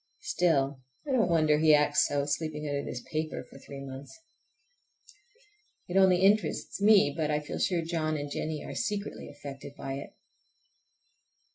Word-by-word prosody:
Still, 140 -6 +1 0.3
I - - -2
don't 230 -8 +3
wonder 155 -3 +3
he 155 -1 +6
acts 150 0 +3
so, 145 -1 -1
sleeping 150 +1 -3
under 140 -1 -2
this 125 - -6
paper 155 0 -3
for - - -14
three 140 0 -9
months. 135 +1 -9 1.8
It 180 - -5
only 190 -1 +5
interests 200 0 +1
me, 205 -8 +6
but 155 -2 -1
I 150 0 +1
feel 150 - -6
sure 175 -3 +1
John 155 -2 -1
and 145 0 -5
Jennie 155 0 -3
are - - -6
secretly 210 -2 -3
affected 140 -1 -9
by 135 -1 -5
it. - - -11
155 Hz, 155 wpm, -29 LUFS, 145-175 Hz, 1.8 s, he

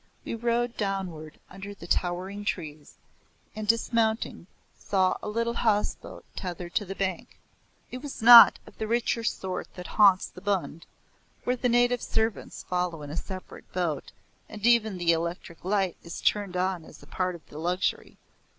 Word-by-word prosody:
We - - -4
rode 235 +1 0
downward 185 -7 -4
under 195 +1 -9
the 170 - -11
towering 185 +4 -1
trees, 155 -7 -5 0.6
and 215 -1 -5
dismounting, 225 -4 +1 0.3
saw 185 -2 +1
a - - -4
little 230 +2 -1
houseboat 215 -3 -1
tethered 175 -1 -6
to 205 - 0
the 195 +1 -6
bank. 190 -3 -3 0.5
It 255 - -5
was 290 -1 -7
not 235 +1 +10
of - - -17
the 220 - -2
richer 235 0 0
sort 190 -5 -3
that 180 - -8 0.2
haunts 195 -2 +7
the 180 - -12
Bund, 190 -5 -2 0.6
where 250 - +1
the 250 0 0
native 245 0 +3
servants 220 -1 -2
follow 180 -3 -2
in 145 - -7
a - - -5
separate 185 +2 -8
boat, 170 -6 -2 0.4
and 215 0 -6
even 225 -4 +4
the 175 -1 +3
electric 170 0 -3
light 190 -1 0
is 170 - -7
turned 200 -3 0
on 185 -2 -1
as - - -14
part 185 -1 -1
of 165 - -14
the 150 - -9
luxury. 180 +3 -1
195 Hz, 160 wpm, -27 LUFS, 175-225 Hz, 0.6 s, not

